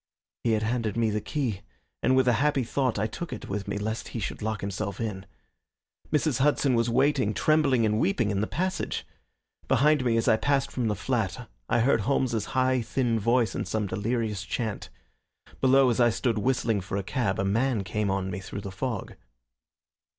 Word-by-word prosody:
He 115 - +2
had 110 0 +1
handed 115 -2 -1
me 115 -2 +2
the 105 0 -1
key, 120 -10 -2 0.4
and 130 - +3
with 130 -1 +3
a 125 - +5
happy 145 -3 +2
thought 130 0 0
I 100 - +1
took 165 +10 -5
it - - -6
with 100 0 -4
me - - -2
lest 110 +2 -3
he 115 - -5
should 105 - -4
lock 110 0 -2
himself 100 0 -4
in. 100 -4 -4 0.8
Mrs. 150 -4 +1
Hudson 140 -1 +3
was 115 0 +2
waiting, 130 -3 +2
trembling 140 -6 +3
and 105 0 +1
weeping, 170 - +1
in 100 -1 0
the 105 - 0
passage. 185 +1 -2 0.6
Behind 150 +2 +3
me 115 -2 +2
as 115 - 0
I 110 -2 +5
passed 140 +2 +1
from 125 -3 -1
the 105 - 0
flat - - -2 0.2
I - - +3
heard 120 -2 +3
Holmes's 120 -2 0
high, 130 0 +3
thin 115 -1 0
voice 115 +2 +2
in - - -2
some 110 -1 -1
delirious 105 +1 -2
chant. 105 +2 -4 0.7
Below, 130 -1 +5
as 115 - -1
I 120 -1 +6
stood 115 -1 0
whistling 115 -3 +1
for 90 +2 -4
a 100 - -2
cab, 110 -2 -1
a 95 - 0
man 115 +2 +1
came 105 +2 -1
on 95 -1 -1
me 90 - -4
through 100 +1 -7
the 100 -1 -6
fog. 110 +2 -4
115 Hz, 195 wpm, -27 LUFS, 105-130 Hz, 0.8 s, I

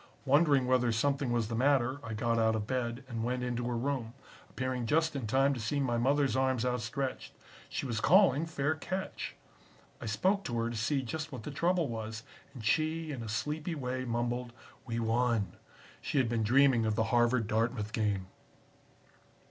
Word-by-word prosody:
Wondering 140 -1 +4
whether 125 -1 +3
something 140 +3 0
was 115 -2 +1
the 115 - -5
matter, 130 +1 +2
I 115 -1 -5
got 115 +1 +1
out 110 0 +3
of 105 -1 -2
bed 125 0 -2
and 115 -3 -4
went 125 +1 -1
into 120 -1 -2
her 120 -1 -1
room, 125 -2 -2 0.3
appearing 130 -2 -3
just 160 +3 +2
in 130 -5 -3
time 135 +4 +3
to 130 - -4
see 115 +7 -1
my 120 -4 +1
mothers 140 +2 +2
arms 130 -2 +1
outstretched. 125 +2 -3 0.4
She - - -3
was 115 -5 -2
calling 165 -4 +5
'Fair 155 -1 0
catch.' 185 +4 -5 0.7
I - - -5
spoke 190 - +1
to 120 -3 -2
her 115 0 0
to - - -5
see 130 +5 0
just 155 +5 -4
what 125 -5 -7
the 150 - -5
trouble 170 +2 +1
was, 110 -1 -5 0.3
and 115 -4 -8
she, 155 +5 +1
in 130 -4 -5
a 115 - -6
sleepy 150 +8 -2
way, 130 -2 -3
mumbled, 120 0 -2 0.3
'We 115 0 -2
won.' 115 -4 +1 0.5
She - - -2
had 130 -3 +3
been 115 -1 0
dreaming 120 0 +4
of 110 - 0
the 110 - +2
Harvard 120 -1 +3
Dartmouth 110 0 -1
game. 105 -4 0
125 Hz, 185 wpm, -31 LUFS, 115-140 Hz, 0.7 s, calling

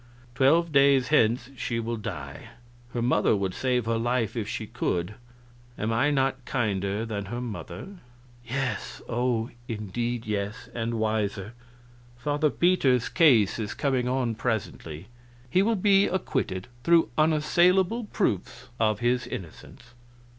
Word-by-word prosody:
Twelve 155 +6 +3
days 140 -2 +4
hence 120 -3 +2
she 120 -1 -2
will 115 +1 -2
die; 110 - -7 0.4
her 120 - -2
mother 110 -3 +3
would 95 -2 -1
save 125 -3 0
her 115 0 0
life 120 -2 0
if 110 -3 -2
she 110 - -4
could. 100 -4 -2 0.6
Am 110 +2 -1
I 130 +6 +3
not 135 -2 0
kinder 105 -5 -1
than 105 -3 -4
her 120 +5 -5
mother?" 125 - -7 0.4
"Yes 130 +2 -3
oh, 120 -1 0 0.2
indeed 115 +2 -3
yes; 105 0 -3
and 115 0 -2
wiser." 110 -1 -1 0.6
"Father 145 +4 +1
Peter's 140 -9 +2
case 120 - +4
is 105 -2 -4
coming 130 -3 0
on 125 -2 0
presently. 100 -8 -3 0.5
He 185 - +4
will 225 +3 +2
be 200 0 +4
acquitted, 95 - -2 0.2
through 170 +1 +4
unassailable 175 +8 +3
proofs 125 - -2
of 110 -1 +1
his 120 +1 +1
innocence." 120 +5 -9
120 Hz, 130 wpm, -27 LUFS, 110-140 Hz, 0.6 s, days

